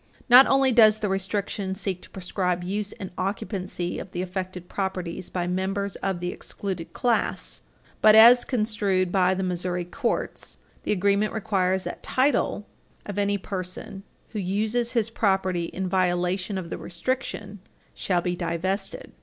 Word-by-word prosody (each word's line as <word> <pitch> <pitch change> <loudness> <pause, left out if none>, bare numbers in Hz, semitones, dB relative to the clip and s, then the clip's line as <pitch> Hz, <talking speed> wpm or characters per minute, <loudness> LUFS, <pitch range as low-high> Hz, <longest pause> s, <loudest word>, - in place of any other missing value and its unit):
Not 250 +3 +9
only 270 -1 +4
does 220 -3 +6
the 210 -2 -2
restriction 195 0 -2
seek 190 -2 -3
to - - -12
proscribe 180 -1 -2
use 205 +3 -2
and 190 - -8
occupancy 190 -2 -3
of 185 - -9
the 180 - -2
affected 185 -1 -5
properties 185 -3 -3
by 180 -1 -2
members 190 +2 -2
of 190 -2 -2
the 180 0 -2
excluded 185 -5 -5
class, 240 -2 -1 0.4
but, 215 0 +7
as 235 +3 +9
construed 210 -6 0
by 185 -1 +3
the 190 - -2
Missouri 180 -1 -2
courts, 235 +7 -3 0.2
the - - -2
agreement 200 +1 +2
requires 190 -3 0
that - - -6
title 260 -5 +1 0.4
of 205 -1 -4
any 200 0 +1
person 195 +1 -6 0.3
who 215 - -4
uses 215 +6 0
his 230 -2 +1
property 190 -5 +1
in 185 +2 -4
violation 185 +1 0
of 175 -3 -6
the - - -4
restriction 205 +1 -4 0.3
shall 180 -2 0
be 180 0 -1
divested. 185 +3 -3
190 Hz, 150 wpm, -25 LUFS, 180-210 Hz, 0.4 s, Not